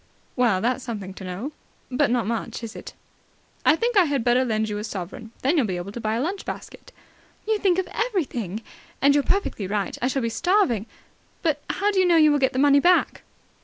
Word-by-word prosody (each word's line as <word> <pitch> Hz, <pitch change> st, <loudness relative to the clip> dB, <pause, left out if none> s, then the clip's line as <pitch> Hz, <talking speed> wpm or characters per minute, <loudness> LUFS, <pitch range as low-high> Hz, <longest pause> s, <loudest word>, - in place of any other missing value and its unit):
"Well, 230 Hz, -7 st, +2 dB
that's 250 Hz, +2 st, 0 dB
something 205 Hz, -6 st, -5 dB
to 190 Hz, -, -10 dB
know." 190 Hz, +10 st, -5 dB, 0.4 s
"But 275 Hz, +3 st, +2 dB
not 240 Hz, -3 st, +1 dB
much, 230 Hz, +2 st, -3 dB
is 225 Hz, -, -7 dB
it?" -, -, -9 dB, 0.7 s
"I 310 Hz, -, +5 dB
think 470 Hz, +6 st, -1 dB
I 385 Hz, -3 st, +6 dB
had 280 Hz, -5 st, 0 dB
better 245 Hz, +2 st, +3 dB
lend 220 Hz, -3 st, 0 dB
you 210 Hz, -1 st, -3 dB
a -, -, -5 dB
sovereign. 205 Hz, +2 st, -6 dB
Then 275 Hz, +6 st, +3 dB
you'll 260 Hz, -7 st, +3 dB
be 185 Hz, -2 st, -2 dB
able 175 Hz, +3 st, -6 dB
to 235 Hz, -, -7 dB
buy 215 Hz, 0 st, -1 dB
a 235 Hz, -, -1 dB
lunch 375 Hz, +7 st, -3 dB
basket." -, -, -8 dB, 0.6 s
"You 435 Hz, -1 st, +1 dB
think 375 Hz, -4 st, +2 dB
of 375 Hz, -, 0 dB, 0.2 s
everything. 240 Hz, -, -3 dB, 0.4 s
And 280 Hz, +1 st, +5 dB
you're 285 Hz, 0 st, +3 dB
perfectly 370 Hz, -, -1 dB
right. 200 Hz, -1 st, -2 dB
I 245 Hz, -, +2 dB
shall 265 Hz, -1 st, -1 dB
be 230 Hz, -, 0 dB
starving. 245 Hz, -, +1 dB, 0.6 s
But 300 Hz, -4 st, +1 dB
how 410 Hz, +2 st, +1 dB
do 390 Hz, -, +1 dB
you 370 Hz, -, +4 dB
know 340 Hz, -1 st, +5 dB
you 305 Hz, -1 st, +6 dB
will 290 Hz, -, +2 dB
get 265 Hz, -1 st, +2 dB
the -, -, -3 dB
money 285 Hz, +1 st, +5 dB
back?" 355 Hz, +5 st, +3 dB
250 Hz, 225 wpm, -24 LUFS, 220-320 Hz, 0.7 s, I